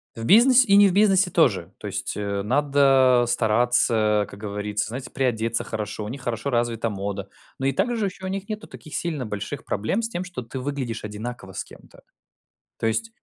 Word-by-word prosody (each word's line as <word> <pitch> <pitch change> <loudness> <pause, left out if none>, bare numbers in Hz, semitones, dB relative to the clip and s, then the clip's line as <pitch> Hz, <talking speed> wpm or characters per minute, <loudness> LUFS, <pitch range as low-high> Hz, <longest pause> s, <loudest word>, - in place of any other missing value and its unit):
В 115 0 -6
бизнес 250 - +7
и 200 - +4
не 205 0 +8
в 180 - 0
бизнесе 195 -2 +4
тоже. 100 - +2
То - - -11
есть, - - -4
э, 100 -1 -2
надо 135 -1 +4
стараться, 110 -2 +2
как 100 - -11
говорится, 105 0 -3
знаете, 130 +1 -6
приодеться 115 -3 0
хорошо, 105 -1 -5
у - - -5
них 135 +1 -7
хорошо 115 +3 -2
развита 120 -2 0
мода. 100 0 -5 0.3
Но 135 - 0
и - - +3
также 225 - 0
ещё 190 0 -6
у - - -3
них 195 +2 -5
нету 215 0 -5
таких 155 - -10
сильно 155 -7 -2
больших 105 +7 -5
проблем 110 - -1
с 225 - -2
тем, 180 -3 -4
что 175 -9 -7
ты 120 +3 -7
выглядишь 130 -5 -4
одинаково 105 -2 -7
с - - -3
кем-то. - - -17 0.8
То - - -2
есть 225 - -1
120 Hz, 195 wpm, -24 LUFS, 105-175 Hz, 0.8 s, не